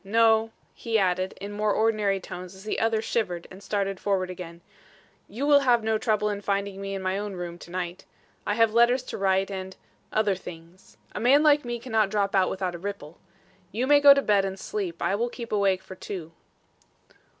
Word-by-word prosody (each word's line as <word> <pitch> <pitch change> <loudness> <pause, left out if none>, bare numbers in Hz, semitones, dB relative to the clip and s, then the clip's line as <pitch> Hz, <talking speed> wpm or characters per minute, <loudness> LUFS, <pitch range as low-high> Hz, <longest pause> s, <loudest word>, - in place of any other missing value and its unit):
No," 225 +2 +3 0.2
he 225 -1 -1
added, 185 -1 0
in 200 +1 -6
more 210 0 0
ordinary 215 -3 +1
tones 180 0 -9
as 190 - -13
the 215 - -2
other 225 -1 +1
shivered 180 -7 -2
and 185 - -10
again - - -15
started 195 -1 -2
forward, 185 -3 -3 0.7
"you 250 +7 -3
will 290 -1 +6
have 245 -4 +3
no 220 0 +1
trouble 215 -2 +1
in 200 0 -4
finding 200 -1 -2
me 195 0 -4
in 190 - -5
my 185 +1 -1
own 205 -1 -4
room 175 -1 -6
to - - -12
night. 180 +1 -5 0.4
I 205 - -1
have 225 -1 +3
letters 240 +2 +4
to - - -6
write 195 0 +1
and 190 -1 -6 0.4
other 215 -2 +2
things. 175 0 -12 0.2
A - - -4
man 265 +6 +5
like 295 -1 +5
me 240 -1 -3
cannot 220 -4 0
drop 200 -1 0
out 190 -2 +3
without 185 -2 -3
a 175 - -7
ripple. 185 -5 -7 0.5
You 235 +5 -1
may 290 +1 +6
go 285 -1 +9
to 275 - +1
bed 205 -2 +3
and 195 0 -3
sleep. 185 -6 -4
I - - +1
will 235 +4 0
keep 235 -1 -8
awake 195 -3 +1
for - - -10
two." 180 -3 -7
200 Hz, 205 wpm, -26 LUFS, 185-225 Hz, 0.7 s, go